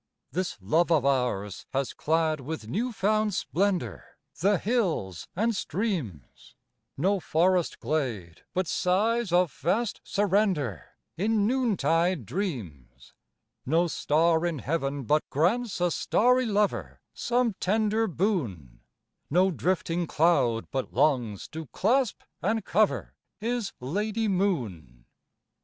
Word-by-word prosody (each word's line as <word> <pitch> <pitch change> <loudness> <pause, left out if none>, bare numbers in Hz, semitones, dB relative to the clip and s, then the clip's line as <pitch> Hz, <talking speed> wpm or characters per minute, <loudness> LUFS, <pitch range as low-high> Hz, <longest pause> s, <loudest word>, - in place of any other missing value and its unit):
This 185 +1 -2
love 160 - +1
of 150 -5 +3
ours 125 -8 0
has 135 -1 -1
clad 160 -1 +1
with 140 -4 -6
new 230 - -1
found 215 -1 +1
splendour 180 +8 -2 0.2
The 200 +3 +3
hills 175 - -1
and 225 +4 +1
streams, 160 - -4 0.4
No 195 +7 +2
forest 175 +1 +1
glade 115 - -3
but 185 +1 +1
sighs 205 +6 +1
of 175 -2 +3
vast 200 - -1
surrender, 190 - 0 0.2
In 210 +3 +2
noontide 180 - +1
dreams, 90 - -5 0.5
No 165 +6 +2
star 160 0 +2
in 170 -3 -1
heaven 140 -1 -2
but 150 +6 +3
grants 190 - +1
a 175 0 +2
starry 250 +7 +2
lover 210 -1 0
Some 240 -2 +1
tender 215 +3 +1
boon, 125 - -2 0.5
No 185 +5 +3
drifting 175 0 -1
cloud 130 -10 +2
but 135 -1 -3
longs 120 -9 +1
to 160 -1 -7
clasp 235 - +1 0.2
and 215 +2 0
cover 215 0 +1 0.2
His 230 0 -2
lady 210 - -1
Moon. 110 - -2
175 Hz, 115 wpm, -27 LUFS, 135-205 Hz, 0.5 s, of